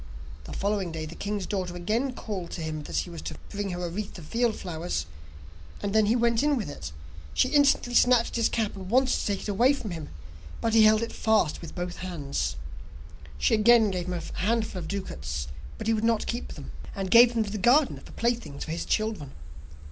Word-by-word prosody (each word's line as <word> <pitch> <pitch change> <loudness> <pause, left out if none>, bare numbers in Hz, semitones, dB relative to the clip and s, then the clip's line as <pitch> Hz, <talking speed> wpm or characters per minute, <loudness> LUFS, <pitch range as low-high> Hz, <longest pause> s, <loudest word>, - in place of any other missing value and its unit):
The - - -7
following 200 -3 -1
day 160 -1 -4
the 155 - -8
king's 205 0 -3
daughter 185 -3 -3
again 220 +9 -1
called 190 -7 -5
to 170 - -5
him 155 -1 -3
that - - -6
he 175 - -1
was 170 - -7
to - - -6 0.2
bring 205 -1 -3
her 180 -1 -3
a - - -3
wreath 200 +2 -5
of 170 - -10
field 235 +5 +1
flowers, 165 - -3 0.8
and 200 - -1
then 215 -1 +4
he 225 - +3
went 235 -1 +2
in 295 -1 +2
with 205 -11 -3
it, 75 - -7 0.4
she 255 - +3
instantly 280 -4 +3
snatched 245 -1 +5
at - - -7
his 230 - +3
cap, 220 -3 -1
and 190 -1 -8
wanted 260 +3 +4
to - - -1
take 200 -2 -1
it - - -6
away 235 +7 +4
from 225 -8 -5
him, 160 -3 -6 0.5
but 225 - 0
he 220 -1 +7
held 215 +1 +5
it 230 - -4
fast 220 -8 +2
with 165 - -9
both 175 -1 -4
hands. 145 - -3 0.8
She 75 - +2
again 220 -1 +6
gave 180 -1 -3
him 180 - -2
a 170 -2 -5
handful 215 -1 0
of 165 - -6
ducats, 75 - -4 0.3
but - - -6
he 225 - +3
would 220 0 -1
not 225 -1 +2
keep 240 +1 -4
them, - - -9 0.2
and 195 -2 -3
gave 240 +1 +8
them 225 - +3
to 205 - -6
the 210 - -3
gardener 260 +7 +4
for - - -13
playthings 235 -11 -2
for 160 - -6
his 165 - -3
children. 215 -11 -1
205 Hz, 225 wpm, -27 LUFS, 175-230 Hz, 0.8 s, gave